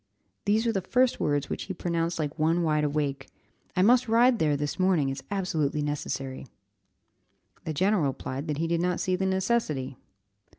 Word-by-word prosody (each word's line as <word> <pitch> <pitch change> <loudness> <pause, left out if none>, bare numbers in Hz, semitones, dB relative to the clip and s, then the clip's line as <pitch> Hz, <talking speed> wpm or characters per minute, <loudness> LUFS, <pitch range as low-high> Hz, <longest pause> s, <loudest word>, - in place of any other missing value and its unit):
These 215 +3 +2
were 230 - +2
the 195 -3 -1
first 250 +6 +2
words 145 -1 0
which - - -4
he 190 - -5
pronounced 170 -1 -1
like 155 0 -3
one 165 +3 +2
wide 155 -2 +1
awake. 145 -2 -1 0.5
"I 185 - +3
must 245 +4 +5
ride 235 +1 +4
there 150 -2 +2
this 145 +5 -3
morning; 180 -7 +2
it's 135 - -4
absolutely 160 -7 -1
necessary." 135 -2 -4 1.2
The 160 - -2
general 190 0 +2
replied 135 +2 -4
that 150 -2 -2
he 165 - 0
did 170 0 0
not 180 0 0
see 185 - 0
the 190 +1 -1
necessity. 190 - -1
165 Hz, 175 wpm, -27 LUFS, 145-190 Hz, 1.2 s, must